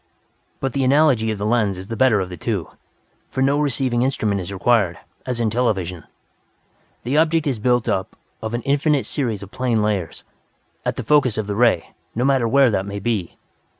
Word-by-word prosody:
"But 135 -2 -2
the 140 - 0
analogy 130 -4 +3
of 110 - -2
the 100 - -3
lens 105 -4 +1
is 95 +1 -8
the 115 - -4
better 115 -2 +4
of 90 - -4
the 90 - -6
two. - - -3 0.6
For 130 - -1
no 140 +2 +2
receiving 130 -4 0
instrument 110 -6 0
is 90 +2 -6
required, 100 -2 +2 0.3
as 125 -2 -2
in 115 -2 +1
television. 95 - -1 1.0
The 130 +5 0
object 160 0 +3
is 135 -6 -1
built 125 +1 +1
up 95 -1 -1 0.3
of 110 +1 -3
an 120 - -3
infinite 145 0 +1
series 115 -8 -2
of 100 - -11
plane 125 -4 0
layers, 100 -7 -2 0.6
at - - -1
the - - -4
focus 140 -7 +3
of 110 - -1
the 100 - -3
ray, 115 -7 +2 0.2
no 120 +3 0
matter 135 -4 +3
where 135 +1 +4
that 100 -1 -1
may 100 0 -5
be. 100 -3 -2
115 Hz, 195 wpm, -21 LUFS, 100-130 Hz, 1.0 s, better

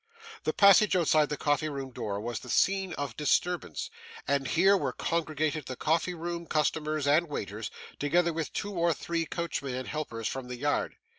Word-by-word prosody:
The - - +2
passage 200 0 +6
outside 155 -4 +3
the 150 - -2
coffee 150 +1 +1
room 135 -2 -5
door 100 -4 -3
was 115 +2 -3
the 125 - -11
scene 195 +3 +2
of 140 -6 -4
disturbance, 175 +4 0 0.4
and 140 -1 +1
here 190 +4 +5
were 195 - -1
congregated 155 -2 -1
the 130 - -4
coffee 165 +5 0
room 170 0 -5
customers 155 0 0
and 155 +4 +4
waiters, 105 -5 -4 0.3
together 170 +4 +2
with 160 -1 -3
two 205 - -3
or 170 -3 +2
three 165 +2 -2
coachmen 150 -7 -3
and 130 -1 -4
helpers 115 -8 -3
from 130 -2 -4
the 125 0 -6
yard. 145 +3 0
155 Hz, 175 wpm, -29 LUFS, 140-170 Hz, 0.4 s, passage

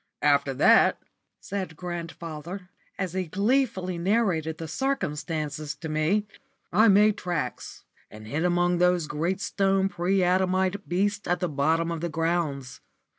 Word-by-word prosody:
"After 140 -2 +3
that," - - +5 0.4
said 190 -4 -5
grandfather, 170 +1 -6 0.3
as 185 -3 -3
he 185 -1 -1
gleefully 195 - 0
narrated 175 -5 0
the 165 - -6
circumstances 155 - -3
to 160 +2 -7
me, 155 +7 +1 0.5
"I 215 +5 +6
made 205 +1 +5
tracks 175 -4 -4 0.3
and 110 0 -12
hid 145 +9 -2
among 175 0 +2
those 180 -2 +3
great 165 +6 -2
stone 195 -1 +1
pre 185 +1 +1
adamite 185 +2 +1
beasts 205 +3 0
at 175 +1 +1
the 180 - 0
bottom 160 +4 +1
of 165 -1 -4
the 170 - -2
grounds. 155 -6 -2
175 Hz, 135 wpm, -26 LUFS, 155-190 Hz, 0.5 s, I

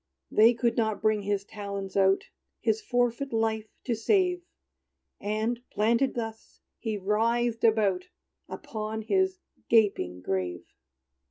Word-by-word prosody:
They 225 +3 +6
could 235 0 0
not 220 -2 +1
bring 215 -1 +3
his 200 0 -1
talons 200 -2 -6
out, 195 0 +4 0.4
His 220 -2 +1
forfeit 245 +2 0
life 220 -1 0 0.2
to 245 - -1
save; 360 - +2 0.8
And 215 +3 -1
planted 230 +5 +2
thus, 225 -2 -6 0.2
he 220 -2 -2
writhed 230 +4 +1
about 210 -5 +3 0.4
Upon 220 0 -5
his 380 - +1 0.3
gaping 195 - +2
grave. 90 -2 -2
220 Hz, 115 wpm, -28 LUFS, 205-235 Hz, 0.8 s, They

